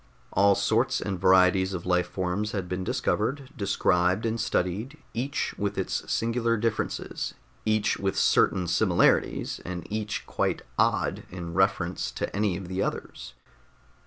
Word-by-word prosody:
All 100 0 +5
sorts 115 +6 +1
and 95 -3 -3
varieties 95 0 +4
of 85 - -6
life 90 -1 +2
forms 95 +4 -2
had 95 -4 -2
been 90 +1 -3
discovered, 130 +8 -1
described 95 0 +1
and 115 0 -1
studied, 110 +7 -1 0.2
each 135 +5 -2
with 100 -1 -1
its 95 - -2
singular 115 0 +1
differences, 115 0 -2 0.3
each 110 -1 +2
with 95 -3 -1
certain 90 - +3
similarities, 85 +1 +2
and 90 -1 -5
each 105 -1 -3
quite - - -1 0.2
"odd" - - +2
in 85 -2 -6
reference 95 -1 +1
to - - -4
any 100 -3 +1
of 95 -2 -7
the 95 +1 -2
others. - - -4
95 Hz, 140 wpm, -27 LUFS, 90-110 Hz, 0.3 s, All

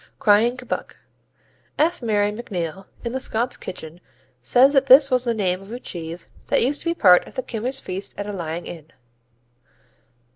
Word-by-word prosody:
Crying 225 +4 +3
Kebbuck 255 -1 -5 0.8
F. 330 +2 +1
Marion 210 -2 0
MacNeill, 190 -5 -5 0.2
in 235 - -3
The 260 - -3
Scots 240 -1 -1
Kitchen 165 -1 -9 0.4
says 250 - +5
that 270 -1 +3
this 275 +1 +7
was 250 0 +2
the 235 -1 0
name 185 -3 0
of 195 +2 -13
a 240 - -5
cheese 170 -6 -7 0.2
that - - +2
used 280 +4 +1
to 335 - -2
be 335 - 0
part 180 - +5
of - - -14
the 260 - -3
Kimmers 250 +4 -3
feast 190 -2 -6
at 205 0 -4
a - - -4
lying 170 -3 -5
in. 160 -3 -9
215 Hz, 180 wpm, -22 LUFS, 180-255 Hz, 0.8 s, this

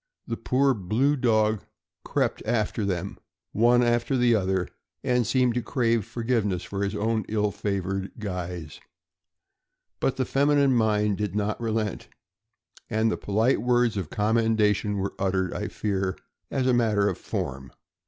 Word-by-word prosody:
The - - -3
poor 135 +1 +2
blue 115 +8 +1
dog 110 -5 +2 0.4
crept - - -1
after 110 -2 0
them, 95 0 -3 0.3
one 120 +3 +4
after 120 +2 +1
the 120 -1 +4
other, 95 -4 +1 0.4
and 125 -3 +1
seemed 125 0 +2
to 125 - 0
crave 115 -3 0
forgiveness 115 -6 -1
for 100 0 -3
his 100 +1 -2
own 110 +1 0
ill 105 -1 +1
favored 95 -1 -3
guise; 90 -6 -5 1.2
but 135 - 0
the 130 - 0
feminine 140 0 +3
mind 105 -3 +2
did 105 -2 -2
not 105 +2 -1
relent, 110 -3 -2 0.8
and 110 +1 0
polite 110 +3 +2
words 120 -1 +2
of 95 -6 -3
commendation 105 -1 +1
were 100 0 -2
uttered, 95 -1 0
I - - -3
fear, 95 -3 -2 0.3
as 130 -2 -1
a 130 - +3
matter 110 -4 +2
of 95 - -2
form. 65 -1 -4
110 Hz, 145 wpm, -26 LUFS, 100-120 Hz, 1.2 s, one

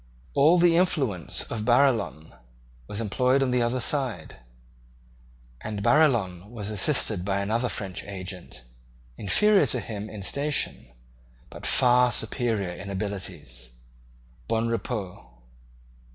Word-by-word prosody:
All 155 +6 +5
the 170 -1 +4
influence 135 - +1
of 110 -2 -5
Barillon 120 - +1 0.5
was 105 - -5
employed 125 +5 +1
on 130 - -1
the 125 0 +1
other 120 +2 0
side; 125 - -1 1.2
and 105 -2 -5
Barillon 115 - +2
was 110 -3 -5
assisted 105 - +3
by 100 +1 -1
another 115 +5 -1
French 95 -3 -5
agent, 95 -9 -8 0.5
inferior 200 - +3
to - - +1
him 105 -1 -7
in 105 -2 -8
station, 140 - -1 0.6
but - - -3
far 125 0 +4
superior 110 -5 -1
in 95 +3 -8
abilities, 80 - -5 0.7
Bonrepaux. 115 -3 -3
110 Hz, 110 wpm, -25 LUFS, 95-125 Hz, 1.2 s, All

